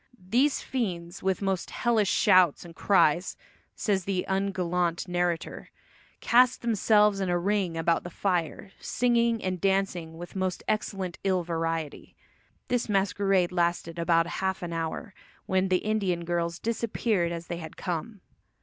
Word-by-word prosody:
"These 245 Hz, +10 st, +1 dB
fiends, 180 Hz, -8 st, -3 dB
with 190 Hz, +1 st, -1 dB
most 190 Hz, -2 st, -1 dB
hellish 225 Hz, -5 st, +1 dB
shouts 185 Hz, -6 st, +4 dB
and 165 Hz, -1 st, -12 dB
cries," 180 Hz, -2 st, +2 dB, 0.4 s
says 195 Hz, -4 st, 0 dB
the 190 Hz, -2 st, -1 dB
ungallant 180 Hz, -3 st, -1 dB
narrator, 175 Hz, -2 st, -2 dB, 0.5 s
"cast 250 Hz, +1 st, +4 dB
themselves 210 Hz, -2 st, +3 dB
in 190 Hz, -2 st, -1 dB
a 175 Hz, -, +2 dB
ring 190 Hz, -2 st, 0 dB
about 165 Hz, +1 st, +1 dB
the 175 Hz, -, -6 dB
fire, 180 Hz, 0 st, -2 dB
singing 235 Hz, -2 st, +1 dB
and 185 Hz, -1 st, -2 dB
dancing 190 Hz, -4 st, 0 dB
with 175 Hz, +3 st, -9 dB
most 185 Hz, -1 st, -2 dB
excellent 195 Hz, -4 st, -2 dB
ill 185 Hz, -2 st, +1 dB
variety." 165 Hz, -2 st, -3 dB, 0.5 s
This 245 Hz, -3 st, -1 dB
masquerade 195 Hz, -2 st, +2 dB
lasted 170 Hz, -1 st, -1 dB
about 165 Hz, 0 st, +3 dB
half 190 Hz, +2 st, -2 dB
an 170 Hz, -1 st, -4 dB
hour, 165 Hz, +5 st, -4 dB, 0.3 s
when 190 Hz, 0 st, +1 dB
the 185 Hz, -1 st, +3 dB
Indian 195 Hz, -6 st, 0 dB
girls 170 Hz, 0 st, -1 dB
disappeared 220 Hz, -5 st, -1 dB
as 170 Hz, 0 st, -5 dB
they 170 Hz, -, -5 dB
had 160 Hz, -2 st, -9 dB
come. 185 Hz, +4 st, -4 dB
185 Hz, 140 wpm, -27 LUFS, 170-200 Hz, 0.5 s, shouts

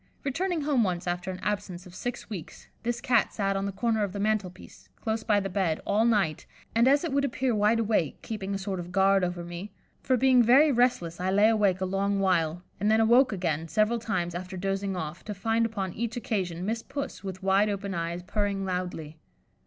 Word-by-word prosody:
Returning 335 Hz, +5 st, -1 dB
home 285 Hz, -5 st, +2 dB
once 180 Hz, -3 st, -2 dB
after 175 Hz, +1 st, -2 dB
an 185 Hz, -, -4 dB
absence 195 Hz, -3 st, -3 dB
of 180 Hz, -, -13 dB
six 245 Hz, +6 st, -5 dB
weeks, 185 Hz, -8 st, -8 dB
this 240 Hz, +1 st, -2 dB
Cat 240 Hz, -3 st, +2 dB
sat 195 Hz, -1 st, -1 dB
on 195 Hz, 0 st, -1 dB
the -, -, -2 dB
corner 220 Hz, +2 st, 0 dB
of 195 Hz, -2 st, -3 dB
the 200 Hz, -, -4 dB
mantel 210 Hz, -2 st, +1 dB
piece, 180 Hz, -, -16 dB
close 220 Hz, 0 st, -2 dB
by 210 Hz, -2 st, +3 dB
the 195 Hz, -, -2 dB
bed, 185 Hz, -4 st, 0 dB
all 210 Hz, +3 st, +2 dB
night, 200 Hz, -10 st, +1 dB, 0.3 s
and 230 Hz, +2 st, +4 dB
as 280 Hz, +3 st, +4 dB
it 330 Hz, -5 st, -2 dB
would 280 Hz, 0 st, +2 dB
appear 260 Hz, -2 st, 0 dB
wide 210 Hz, +2 st, +3 dB
awake, 210 Hz, -9 st, 0 dB
keeping 200 Hz, -3 st, -4 dB
a -, -, 0 dB
sort 195 Hz, -1 st, -4 dB
of 175 Hz, 0 st, -7 dB
guard 195 Hz, 0 st, +4 dB
over 175 Hz, -1 st, -2 dB
me, 175 Hz, +4 st, -7 dB, 0.3 s
for 260 Hz, -1 st, +2 dB
being 255 Hz, 0 st, +5 dB
very 270 Hz, +6 st, +6 dB
restless 235 Hz, -10 st, +1 dB
I 185 Hz, +1 st, -1 dB
lay 205 Hz, +3 st, +5 dB
awake 200 Hz, -4 st, +2 dB
a -, -, +1 dB
long 195 Hz, +1 st, 0 dB
while, 175 Hz, -3 st, +1 dB, 0.2 s
and 205 Hz, +2 st, +1 dB
then 220 Hz, +1 st, +4 dB
awoke 240 Hz, +4 st, +5 dB
again, 165 Hz, -5 st, -2 dB
several 215 Hz, +6 st, +1 dB
times, 180 Hz, -7 st, -2 dB
after 185 Hz, +2 st, -6 dB
dozing 195 Hz, +1 st, -2 dB
off, 160 Hz, -1 st, -5 dB
to 210 Hz, -, -5 dB
find 225 Hz, +3 st, +1 dB
upon 195 Hz, -5 st, -4 dB
each 235 Hz, +2 st, -3 dB
occasion 185 Hz, -7 st, -2 dB
Miss 225 Hz, +2 st, -1 dB
Puss, 280 Hz, -3 st, -6 dB
with 190 Hz, -1 st, -6 dB
wide 195 Hz, +2 st, +3 dB
open 200 Hz, -1 st, -3 dB
eyes, 170 Hz, 0 st, -3 dB
purring 200 Hz, 0 st, -1 dB
loudly. 180 Hz, -4 st, -4 dB
200 Hz, 215 wpm, -28 LUFS, 180-225 Hz, 0.3 s, very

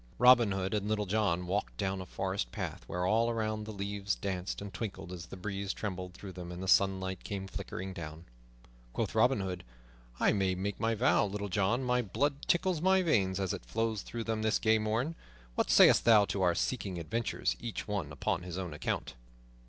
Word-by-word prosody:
Robin 120 Hz, -3 st, +7 dB
Hood 95 Hz, 0 st, -1 dB
and 105 Hz, -1 st, -1 dB
Little 105 Hz, -1 st, 0 dB
John 95 Hz, -3 st, +1 dB
walked 100 Hz, +4 st, -2 dB
down 95 Hz, -1 st, -1 dB
a 90 Hz, -, -8 dB
forest 95 Hz, +1 st, -2 dB
path -, -, -5 dB
where 90 Hz, 0 st, -2 dB
all 115 Hz, +4 st, +3 dB
around 110 Hz, -2 st, -2 dB
the 110 Hz, -, -6 dB
leaves 100 Hz, -1 st, -2 dB
danced 95 Hz, -1 st, -3 dB
and 100 Hz, -2 st, -7 dB
twinkled 95 Hz, -1 st, -5 dB
as 85 Hz, -2 st, -7 dB
the -, -, -9 dB
breeze 100 Hz, +1 st, -3 dB
trembled 90 Hz, -3 st, -5 dB
through 100 Hz, -, -8 dB
them 90 Hz, -1 st, -7 dB
and 90 Hz, +1 st, -6 dB
the -, -, -4 dB
sunlight 95 Hz, -1 st, +2 dB
came 100 Hz, -2 st, -4 dB
flickering 95 Hz, 0 st, -6 dB
down. 80 Hz, -2 st, -8 dB, 0.7 s
Quoth -, -, -1 dB
Robin 115 Hz, +1 st, +3 dB
Hood, 90 Hz, -2 st, -4 dB, 0.6 s
"I -, -, +4 dB
make 95 Hz, 0 st, -1 dB
my 115 Hz, 0 st, +1 dB
vow, 110 Hz, -2 st, +3 dB
Little 100 Hz, +1 st, -4 dB
John, 105 Hz, +7 st, +1 dB
my 125 Hz, 0 st, +2 dB
blood 140 Hz, +7 st, -1 dB
tickles 175 Hz, -2 st, +2 dB
my 190 Hz, +1 st, +4 dB
veins 95 Hz, -, +2 dB
as 95 Hz, -2 st, -1 dB
it -, -, -6 dB
flows 110 Hz, -, -1 dB
through 115 Hz, -1 st, -5 dB
them 110 Hz, -1 st, -2 dB
this 110 Hz, 0 st, +2 dB
gay 110 Hz, 0 st, +3 dB
morn. 110 Hz, +8 st, 0 dB, 0.4 s
What -, -, 0 dB
sayst -, -, +7 dB
thou 110 Hz, -3 st, +7 dB
to 100 Hz, -, -2 dB
our 90 Hz, -2 st, +3 dB
seeking 95 Hz, -1 st, -2 dB
adventures, 110 Hz, +8 st, -1 dB
each 115 Hz, -2 st, -5 dB
one 100 Hz, -8 st, -2 dB
upon 75 Hz, +5 st, -1 dB
his 90 Hz, 0 st, -6 dB
own 90 Hz, -4 st, -4 dB
account?" 75 Hz, -, -3 dB
100 Hz, 200 wpm, -32 LUFS, 95-110 Hz, 0.7 s, Robin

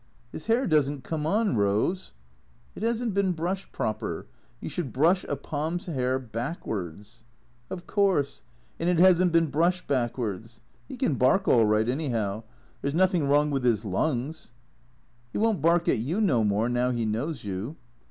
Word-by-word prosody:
" 120 Hz, -, -34 dB
His 155 Hz, -, -8 dB
hair 235 Hz, +4 st, +3 dB
does 150 Hz, -4 st, +3 dB
n't 145 Hz, -3 st, -6 dB
come 155 Hz, 0 st, -3 dB
on, 210 Hz, -, +1 dB
Eose 105 Hz, -, 0 dB, 0.2 s
" -, -, -35 dB
" -, -, -33 dB
It -, -, -8 dB
has 230 Hz, +2 st, 0 dB
n't 225 Hz, -, -1 dB
been 195 Hz, -2 st, +2 dB
brushed 180 Hz, +4 st, -3 dB
proper. 110 Hz, 0 st, -3 dB, 0.3 s
You -, -, -6 dB
should 165 Hz, -9 st, -4 dB
brush 170 Hz, +7 st, +3 dB
a 145 Hz, -, -2 dB
Pom's 160 Hz, +7 st, -4 dB
'air 130 Hz, -5 st, 0 dB
backwards 115 Hz, -, -5 dB, 0.2 s
" 120 Hz, -, -36 dB
" 115 Hz, 0 st, -36 dB
Of 180 Hz, -2 st, -6 dB
course, 190 Hz, -9 st, +1 dB, 0.4 s
and 170 Hz, -, +1 dB
it 180 Hz, -, +2 dB
has 180 Hz, 0 st, +6 dB
n't 180 Hz, -, +2 dB
been 165 Hz, -3 st, +3 dB
brushed 175 Hz, +5 st, +1 dB
backwards. 115 Hz, -4 st, -2 dB, 0.3 s
He 265 Hz, -, -8 dB
can 250 Hz, -, +1 dB
bark 135 Hz, +10 st, +2 dB
all 115 Hz, -2 st, +5 dB
right, 105 Hz, +1 st, +2 dB
anyhow. 115 Hz, -7 st, -1 dB, 0.4 s
There 140 Hz, -, -1 dB
's 140 Hz, -, -3 dB
nothing 180 Hz, -4 st, +3 dB
wrong 145 Hz, +1 st, +3 dB
with 135 Hz, -2 st, -1 dB
his 115 Hz, -3 st, +2 dB
lungs." 130 Hz, -, -2 dB, 0.4 s
" 120 Hz, -1 st, -36 dB
He -, -, -2 dB
won't 220 Hz, -6 st, +1 dB
bark 170 Hz, +2 st, +3 dB
at -, -, +3 dB
you 150 Hz, -, -1 dB
no 140 Hz, -, +3 dB
more, 105 Hz, +2 st, +1 dB
now 125 Hz, +1 st, +1 dB
he 120 Hz, -2 st, -1 dB
knows 120 Hz, +6 st, -2 dB
you." 100 Hz, +8 st, -4 dB
140 Hz, 195 wpm, -27 LUFS, 115-175 Hz, 0.4 s, has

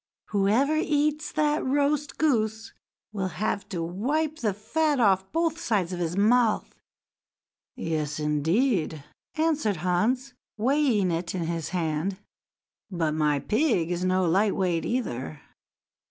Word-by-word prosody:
Whoever 220 Hz, +9 st, +2 dB
eats 300 Hz, -1 st, 0 dB
that 300 Hz, 0 st, +1 dB
roast 285 Hz, +2 st, 0 dB
goose 225 Hz, -6 st, 0 dB, 0.4 s
will 195 Hz, -3 st, -2 dB
have 200 Hz, +3 st, -3 dB
to 175 Hz, -6 st, -3 dB
wipe 285 Hz, -, -1 dB
the 215 Hz, -3 st, +1 dB
fat 290 Hz, +9 st, 0 dB
off 190 Hz, -4 st, +2 dB
both 330 Hz, 0 st, 0 dB
sides 195 Hz, -, 0 dB
of 175 Hz, -, -4 dB
his 175 Hz, +1 st, -2 dB
mouth." 225 Hz, +2 st, +3 dB, 1.0 s
"Yes, 155 Hz, -2 st, -2 dB
indeed!" 160 Hz, -, 0 dB, 0.3 s
answered 310 Hz, -, +1 dB
Hans, 250 Hz, +9 st, +1 dB, 0.2 s
weighing 240 Hz, -5 st, +2 dB
it 170 Hz, +2 st, -3 dB
in 175 Hz, -, -2 dB
his 165 Hz, -1 st, -3 dB
hand; 170 Hz, +1 st, -1 dB, 0.7 s
"but 170 Hz, -5 st, -1 dB
my 150 Hz, -2 st, +2 dB
pig 215 Hz, -, +1 dB
is 175 Hz, 0 st, -2 dB
no 185 Hz, 0 st, +2 dB
light 195 Hz, +5 st, +2 dB
weight, 180 Hz, -3 st, 0 dB
either." 130 Hz, -, -3 dB
205 Hz, 125 wpm, -26 LUFS, 170-275 Hz, 1.0 s, mouth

